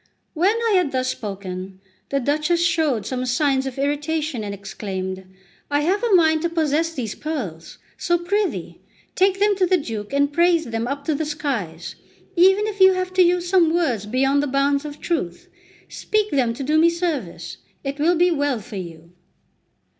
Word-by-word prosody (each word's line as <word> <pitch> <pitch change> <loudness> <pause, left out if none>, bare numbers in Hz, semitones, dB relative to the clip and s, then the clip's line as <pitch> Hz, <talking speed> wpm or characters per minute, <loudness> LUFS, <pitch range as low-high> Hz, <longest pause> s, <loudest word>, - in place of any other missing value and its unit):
When 370 +7 +2
I - - +2
had 350 -6 +1
thus 255 0 0
spoken, 190 -3 -6 0.3
the 275 - 0
Duchess 305 +6 +1
showed 310 - +1
some 255 +2 -3
signs 270 +1 +1
of 265 - -6
irritation, 290 -2 -1
and 205 - -4
exclaimed: 190 -1 -5 0.4
"I 290 0 +1
have 370 +7 +1
a 450 -5 +4
mind 315 -2 +4
to 340 - 0
possess 325 0 0
these 245 -9 -4
pearls; 210 - -6 0.2
so, 345 - +2
prithee, 390 +3 -2 0.3
take 385 0 +2
them 410 0 +3
to 370 -2 +2
the 370 - +4
Duke, 225 -8 -5
and 285 +1 +1
praise 340 0 +3
them 230 0 -3
up 280 +2 -4
to 315 - +1
the 295 - -1
skies; 235 - -4 0.4
even 385 +4 +5
if 420 -2 -5
you 380 0 +7
have 370 0 -3
to 370 - +4
use 355 0 +3
some 350 -3 +4
words 255 - 0
beyond 270 +5 +2
the 290 - -1
bounds 280 +1 +1
of 295 -1 -7
truth, 185 - -3 0.4
speak 425 -1 -1
them 245 -4 +1
to 275 - -5
do 305 +3 +2
me 335 +1 +6
service; 285 - -3 0.3
it 280 +1 -4
will 335 +4 +3
be 350 +2 +3
well 285 -6 0
for 215 0 -9
you!" 170 -2 -9
290 Hz, 185 wpm, -22 LUFS, 235-345 Hz, 0.4 s, you